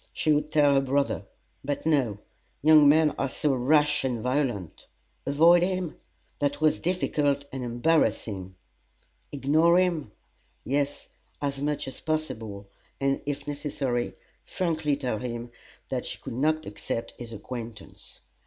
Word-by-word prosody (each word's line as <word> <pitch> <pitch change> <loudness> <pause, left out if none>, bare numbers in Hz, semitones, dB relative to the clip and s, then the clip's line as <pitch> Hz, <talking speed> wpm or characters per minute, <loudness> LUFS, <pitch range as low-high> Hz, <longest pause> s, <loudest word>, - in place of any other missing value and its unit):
She 155 - +1
would 150 +1 0
tell 145 -2 +5
her 135 - +4
brother; 140 +1 0 0.4
but 145 +1 -3
no 135 -10 +2 0.5
young 155 -1 +8
men 155 0 +5
are 135 - 0
so 145 +2 0
rash 150 +3 +3
and 125 -3 -1
violent. 125 - -2 0.4
Avoid 165 +5 +6
him? 185 -2 -1 0.4
That 145 0 0
was 155 0 +3
difficult 145 -5 0
and 130 -1 -4
embarrassing. 120 - 0 0.8
Ignore 155 +5 +3
him? 170 - +1 0.5
Yes, 145 +1 -1 0.3
as 140 -1 -2
much 150 -1 -1
as 135 - -7
possible, 110 -11 -3 0.3
and, 135 0 +1
if 145 0 -3
necessary, 140 -4 -2 0.3
frankly 160 -5 -1
tell 125 -6 -2
him 120 0 -5 0.4
that - - -2
she - - -5
could - - -8
not 155 +5 +1
accept 115 +3 -4
his 120 -2 -7
acquaintance. 115 -1 -8
140 Hz, 135 wpm, -27 LUFS, 120-155 Hz, 0.8 s, young